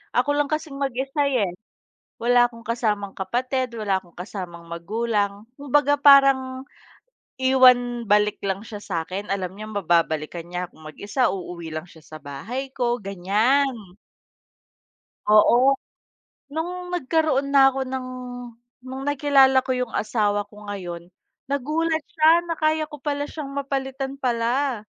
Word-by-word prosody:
ako 255 +4 +2
lang 290 -1 +2
kasing 305 -2 -4
mag-isa 275 +2 -1
,eh, 220 -10 +1 0.7
wala 245 0 +5
akong 230 -1 -14
kasamang 210 -3 -1
kapatid, 250 +5 -2
wala 200 -4 0
akong 175 -2 -23
kasamang 180 -2 -7
magulang. 205 +3 -2 0.2
Kumbaga 285 +1 +2
parang 270 -2 +5 0.8
iwan 250 -2 +4
balik 210 0 +3
lang 195 +1 -2
siya 210 -2 -8
sa'kin, 185 +3 -4
alam 190 -1 -3
niyang 215 0 -8
mababalikan 165 -2 0
niya 180 0 -4
akong 155 - -19
mag-isa, 205 - -1
uuwi 175 -3 -6
lang 155 +3 -5
siya 160 -3 -17
sa 155 - -10
bahay 215 - -6
ko, 245 -1 0
ganiyan. 205 +3 0 1.3
Oo, 240 +6 +5 0.8
no'ng 355 +4 -4
nagkaroon 310 -4 0
na 270 -1 +7
ako 265 0 -2
ng 260 0 -4 0.7
no'ng 260 +1 -7
nakilala 275 -2 +4
ko 255 0 -2
'yung 250 -2 -3
asawa 205 -2 0
ko 210 - -18
ngayon, 175 -3 -7 0.4
nagulat 315 +4 0
siya 325 +1 +5
na 335 - -2
kaya 310 0 +1
ko 295 - -9
pala 290 0 -3
siyang 285 -3 -7
mapalitan 270 -1 -3
pala. 245 0 0
245 Hz, 135 wpm, -23 LUFS, 200-275 Hz, 1.3 s, na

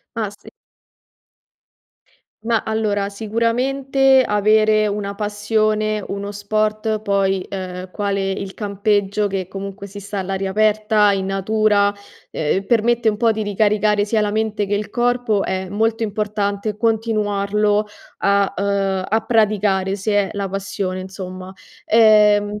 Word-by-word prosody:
Ah 225 -2 -1
sì. 205 - -15 1.9
Ma 230 -2 0
allora 210 -2 -1
sicuramente 255 +5 +1
avere 215 +1 +3
una 200 -1 -3
passione, 215 0 0
uno 200 +1 -4
sport 215 +1 -1
poi, 195 -2 0
ehm, 185 -1 -6
quale 195 -2 -1
il 195 0 -5
campeggio, 205 0 0
che 190 -2 -3
comunque 195 +1 -7
si 200 +1 -10
sta 200 +1 -6
all'aria 195 0 -2
aperta, 215 0 +3
in 190 -1 -1
natura, 205 +1 +1 0.4
ehm, 160 +6 -1
permette 235 +1 +2
un 210 - +1
po' 230 +1 +2
di 220 -1 -1
ricaricare 205 0 +2
sia 215 +1 0
la 210 -1 0
mente 215 -1 -1
che 205 - -1
il 205 0 -3
corpo, 240 -4 +1
è 190 0 -3
molto 225 +3 0
importante 210 -1 -2
continuarlo 210 -2 0 0.3
a, 200 0 +2
ehm, 195 -1 0
a 220 +2 +2
praticare, 205 -4 +1
se 205 +2 -2
è 205 -1 +2
la 200 -2 -3
passione 195 -1 -3
insomma. 185 0 -8 0.3
Ehm, 210 -2 +4
205 Hz, 130 wpm, -20 LUFS, 200-215 Hz, 1.9 s, Ehm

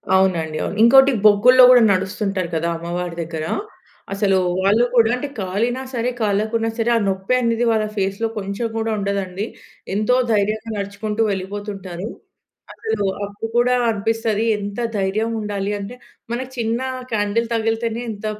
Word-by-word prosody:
అవునండి. 170 -5 +1
అవును. 200 - -4
ఇంకోటి 265 +4 +7
బొగ్గుల్లో 240 +5 +7
గూడా 250 -1 +7
నడుస్తుంటారు 190 -1 -2
కదా! 160 +1 0
అమ్మవారి 175 +1 -4
దగ్గర. 160 -1 -5 0.7
అసలు 195 -1 +2 0.2
వాళ్ళు 205 +5 +3
కూడా 230 -2 +5
అంటే, 250 +3 -4
కాలినా 220 +7 -1
సరే! 240 0 0
కాలకున్నా 220 +2 0
సరే! 230 0 0
ఆ - - +2
నొప్పి 190 +4 -1
అనేది 230 0 +1
వాళ్ళ 220 -1 +1
ఫేస్‌లో 195 +3 0
కొంచుం 200 +3 -3
గూడా 225 0 -1
ఉండదండి. 200 0 -2 0.5
ఎంతో 215 +4 +2 0.2
ధైర్యంగా 215 +2 0
నడుచుకుంటూ 205 +2 -3
వెళ్ళిపోతుంటారు. 195 -1 -5 0.7
అసలూ 220 -2 -2 0.2
అప్పుడు 205 +2 -6
కూడా 250 +1 +3
అనిపిస్తది 225 0 0
ఎంత 205 +1 -5 0.2
ధైర్యం 200 +3 0
ఉండాలి 205 -1 -3
అంటే, 200 +5 -7 0.4
మనకి 255 +2 -4
చిన్నా 235 +3 -1 0.3
క్యాండిల్ 210 +2 0
తగిలితేనే 225 +1 -1
ఎంత 210 0 -8
210 Hz, 135 wpm, -20 LUFS, 195-230 Hz, 0.7 s, ఇంకోటి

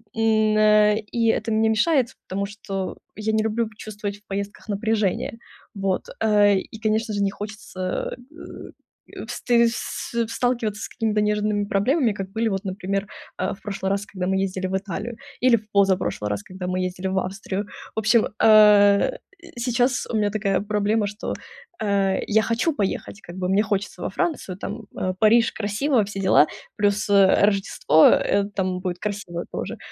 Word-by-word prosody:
м, 220 -1 +2
э, 210 0 +5
и 230 -1 +2
это 220 +1 -2
мне 220 +1 +3
мешает, 245 +3 +2 0.2
потому 200 +1 -2
что 195 -2 -5 0.2
я 215 +1 -2
не 220 - +2
люблю 220 +1 0
чувствовать 205 -1 -6
в 205 - -30
поездках 200 +2 -5
напряжение. 215 +1 -1 0.4
Вот. 195 -2 0 0.2
Э, 205 -2 +4
и 220 - -10
конечно, 220 0 0
же 200 - -1
не 195 - +1
хочется, 205 -3 -5 0.2
э, 335 - -12
вст - - -8 0.7
в 235 -1 +1
сталкиваться 230 -4 -1
с - - -4
какими-то 215 -2 0
нежными 210 0 0
проблемами, 230 +5 +1
как 195 -2 -5
были 225 +1 0
вот, 195 -1 -2
например, 195 +1 -3 0.3
э, 185 - -1
в - - -24
прошлый 195 -2 -3
раз, 200 +1 -1
когда 185 -3 -4
мы 190 0 +1
ездили 190 -1 -2
в 190 - -2
Италию, 210 +4 -5 0.2
или 250 -1 +5
в 215 -1 -13
позапрошлый 190 - +1
раз, 100 0 -3
когда 185 - -7
мы 185 0 -1
ездили 180 +1 -4
в 190 0 -1
Австрию. 195 +1 -4 0.3
В - - 0
общем, 220 +1 +3
э, 210 - +6 0.4
сейчас 245 +1 +1
у 230 - -4
меня 210 -1 +2
такая 200 -2 0
проблема, 210 +1 0
что, 205 +1 -5 0.5
э, 200 -2 +1
я 220 +1 +3
хочу 230 +9 0
поехать 200 0 -3
как 175 - -11
бы, 180 -1 -2
мне 195 +2 +3
хочется 205 -1 -3
во - - -1
Францию, 320 - -2
там, 215 +3 -6
э, 185 - -1
Париж, 230 +2 +5
красиво, 220 +4 0
все 195 0 -6
дела, 185 -5 +5 0.3
плюс, 205 0 0
э, 200 0 +5
Рождество, 195 -5 +3
э, 200 0 +3
там 185 -1 -1
будет 180 -1 -3
красиво 195 -5 -4
тоже. - - -5
205 Hz, 170 wpm, -23 LUFS, 195-220 Hz, 0.7 s, э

